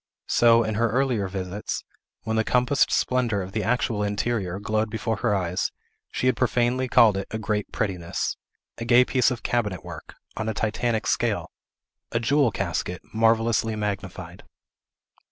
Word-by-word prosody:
So, 115 -1 +5
in 110 0 -2
her 115 - +3
earlier 125 -4 +1
visits, 95 +1 -4 0.4
when 110 0 -2
the 110 - +2
compassed 125 +4 +2
splendor 120 -6 +1
Of 95 - -8
the 110 - -1
actual 115 0 0
interior 100 -2 -1
glowed 110 +2 -1
before 110 +1 -2
her 105 - +1
eyes, 90 -2 -1 0.4
she - - -2
had 130 - +3
profanely 125 +2 +1
called 115 -5 +5
it 95 - -4
a 110 - -3
great 105 -1 -2
prettiness; 90 -5 -2 0.4
a 115 - -4
gay 120 +2 +6
piece 130 0 +2
of 120 -4 -5
cabinet 105 -7 -1
work, - - -9 0.2
on 110 0 -2
a 110 - -3
Titanic 110 +1 -1
scale; - - 0 0.6
a 115 - +1
jewel 140 +2 +3
casket, 90 -2 -3
marvellously 115 0 +2
magnified. 95 -4 -5
110 Hz, 155 wpm, -25 LUFS, 100-120 Hz, 0.6 s, gay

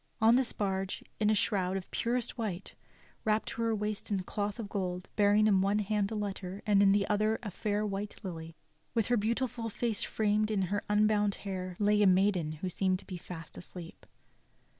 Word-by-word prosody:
On 225 +2 +6
this 255 -1 +2
barge, 195 -2 -2 0.2
in 210 -1 +3
a 215 - +4
shroud 190 -3 +1
of 185 - -8
purest 240 0 -1
white, 200 -6 -4 0.5
wrapped 215 0 +1
to - - -5
her 230 -1 +2
waist 210 0 -2
in 195 -3 0
cloth 205 +1 -3
of 225 -4 -5
gold, 185 -3 -3
bearing 205 +1 +4
in 195 -3 +4
one 200 +2 +2
hand 210 -1 0
a 220 - -4
letter 200 -2 -4
and 205 -1 +4
in 195 -1 +6
the 200 0 +3
other 215 +1 +2
a 205 - -4
fair 210 +3 -1
white 205 0 -3
lily, 165 -3 -6 0.4
with 225 -2 +2
her 245 - +4
beautiful 230 +1 -1
face 225 0 -1
framed 215 0 +1
in 205 -3 +1
her 205 - 0
unbound 210 -1 +3
hair, 185 -2 -4
lay 210 0 +3
a 205 - +6
maiden 185 -4 +3
who 155 +4 -5
seemed 185 +1 +1
to - - -11
them - - -21
to - - -5
be - - -3
fast 165 -2 -9
asleep. 175 -1 -10
205 Hz, 205 wpm, -31 LUFS, 190-215 Hz, 0.5 s, On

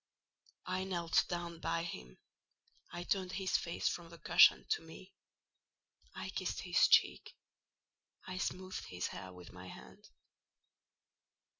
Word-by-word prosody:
I 185 +1 -1
knelt 175 -3 +1
down 175 -1 -4
by 165 +1 -1
him; 60 - -7 0.7
I 175 - -5
turned 185 0 -1
his 190 -2 -1
face 170 - 0
from 170 -1 -3
the 170 - -12
cushion - - +6
to 435 - +2
me; - - -13 1.0
I - - -5
kissed - - -3
his - - +4
cheek; - - +3 0.9
I 185 0 -5
smoothed 185 0 -3
his 90 0 -4
hair 95 -1 -8
with 90 -1 -12
my 90 0 -10
hand. 65 -7 -13
170 Hz, 130 wpm, -35 LUFS, -, 1.0 s, cushion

